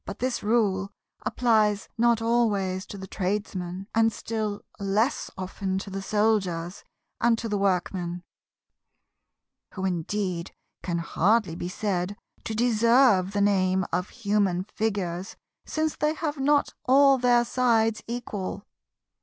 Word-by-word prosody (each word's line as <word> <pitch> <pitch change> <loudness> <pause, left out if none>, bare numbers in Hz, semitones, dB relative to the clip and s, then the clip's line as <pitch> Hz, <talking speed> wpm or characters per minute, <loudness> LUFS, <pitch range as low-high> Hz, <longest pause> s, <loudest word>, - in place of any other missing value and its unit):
But 200 - -7
this 255 0 -1
rule 205 -3 +1 0.4
applies 215 -4 +2
not 235 -1 +3
always 205 -5 +1
to 200 - -8
the 190 - -7
Tradesman, 190 -1 -3
and 225 0 +4
still 215 -1 -4 0.2
less 205 +6 0
often 190 0 -3
to 195 +1 -6
the 195 +1 -4
Soldiers, 195 -5 0 0.4
and 235 -1 +3
to 230 - -4
the 205 -2 -1
Workmen; 180 -2 -1 1.5
who 190 -1 -3
indeed 180 0 -2 0.3
can 175 -2 -2
hardly 190 +3 +1
be 175 +1 -4
said 195 0 -2 0.3
to 220 - -3
deserve 230 -3 +4
the 205 - +1
name 190 -2 +2
of 180 +2 -1
human 200 -5 0
Figures, 195 -3 -3 0.3
since 315 0 -1
they 300 +1 0
have 305 -3 -3
not 285 +1 +2
all 275 +1 +6
their 240 -1 +4
sides 225 -3 +2
equal. 215 -5 -5
205 Hz, 130 wpm, -26 LUFS, 190-230 Hz, 1.5 s, all